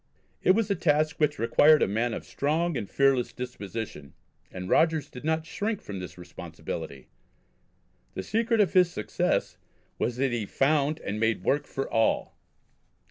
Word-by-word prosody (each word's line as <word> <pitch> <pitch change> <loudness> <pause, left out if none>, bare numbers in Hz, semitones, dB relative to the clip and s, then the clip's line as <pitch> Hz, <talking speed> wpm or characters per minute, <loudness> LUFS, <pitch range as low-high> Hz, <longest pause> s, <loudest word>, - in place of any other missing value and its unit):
It 185 - +5
was 220 -2 0
a - - +3
task 155 -1 +1
which 150 -1 +2
required 145 +7 +5
a - - +2
man 115 +4 0
of - - -7
strong 160 +3 0
and 105 -6 -4
fearless 135 -3 +2
disposition, 110 - -6 0.4
and 90 0 -6
Rogers 160 - +2
did 125 - -10
not 160 +1 0
shrink 210 +5 -2
from 100 -2 -7
the 90 - -6
responsibility. 85 -6 -8 1.1
The 95 - -3
secret 230 - +1
of 200 - +1
his 180 -2 +5
success 105 - -1 0.4
was 120 - 0
that 135 0 +1
he 115 -4 -2
found 145 +4 +1
and 105 +1 -4
made 110 0 +1
work 145 - +1
for 135 - -3
all. 115 -1 +1
135 Hz, 160 wpm, -27 LUFS, 110-160 Hz, 1.1 s, It